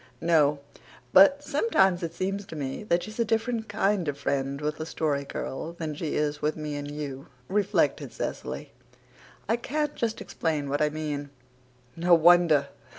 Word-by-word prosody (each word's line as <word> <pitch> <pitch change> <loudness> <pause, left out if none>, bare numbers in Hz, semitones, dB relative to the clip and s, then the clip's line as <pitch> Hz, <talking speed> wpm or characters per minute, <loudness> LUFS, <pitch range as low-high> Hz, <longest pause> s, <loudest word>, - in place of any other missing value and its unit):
"No, 150 -3 +3 0.6
but 280 +10 +7
sometimes 195 - +2
it 165 -1 -4
seems 195 +2 -2
to - - -8
me 135 +1 -4
that 175 -3 +1
she's 215 +2 -9
a - - +4
different 225 0 -1
kind 200 -3 +1
of 145 -1 -2
friend 140 0 -1
with 150 +1 -2
the 155 - -4
Story 145 -4 -1
Girl 155 +4 -5
than 160 -3 -4
she 150 +1 -3
is 150 0 -1
with 150 +1 0
me 150 -1 -4
and 145 0 -5
you," 145 -2 -6 0.2
reflected 205 +1 +1
Cecily. - - -5 0.8
"I 225 - +2
can't 295 +4 -2
just 225 -1 -2
explain 150 -4 -2
what 145 +2 0
I 150 - +3
mean." 150 -2 -4 0.7
"No 175 +1 +5
wonder. 165 -4 +5
160 Hz, 165 wpm, -27 LUFS, 145-200 Hz, 0.8 s, but